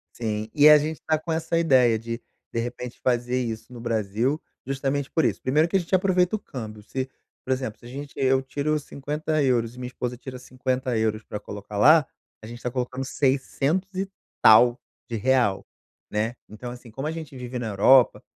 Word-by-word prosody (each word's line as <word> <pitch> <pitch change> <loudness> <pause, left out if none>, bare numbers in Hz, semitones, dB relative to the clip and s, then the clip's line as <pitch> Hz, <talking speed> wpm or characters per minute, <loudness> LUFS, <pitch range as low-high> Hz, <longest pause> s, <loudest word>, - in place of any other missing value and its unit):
Sim, 110 -2 -2
e 150 +1 +7
a 150 - +10
gente 155 +1 -3
tá 155 - +3
com 160 +2 -5
essa 165 +1 -1
ideia 130 -8 +4
de 115 +1 -5 0.3
de 115 - 0
repente 120 +1 -5
fazer 125 0 +1
isso 115 +1 -6
no 120 - -9
Brasil 115 +5 0 0.2
justamente 135 +1 -2
por 160 - +1
isso, - - 0
primeiro 150 +5 +3
que 170 - -3
a - - +5
gente 175 +1 0
aproveita 185 0 +2
o - - -3
câmbio, 110 - -8
se, 130 +4 -4 0.3
por 130 - -4
exemplo, 130 -5 -2
se - - -17
a - - -10
gente 140 +2 -7
e - - -8
eu - - +4
eu - - -2
tiro 145 +3 -1
50 150 +2 -2
euros 120 -4 +1
e 125 - -12
minha 125 - -4
esposa 125 -1 -4
tira 130 +1 -8
50 130 0 -2
euros 110 -1 0
pra 105 - -6
colocar 105 0 -8
lá, 155 +5 +7 0.4
a - - -7
gente 120 +2 -9
tá 125 - -2
colocando 125 +1 -3
seiscentos 140 +7 0
e 190 +1 -1 0.3
tal 120 +3 +7 0.3
de 115 - -3
real, 120 -4 +2 0.5
né. 110 +3 -1
Então, 110 +4 -8
assim, 120 -1 -11
como 135 +6 -4
a - - -1
gente 160 -3 -7
vive 125 0 -6
na 120 -2 -3
Europa, 120 +6 +5
130 Hz, 210 wpm, -25 LUFS, 115-145 Hz, 0.5 s, a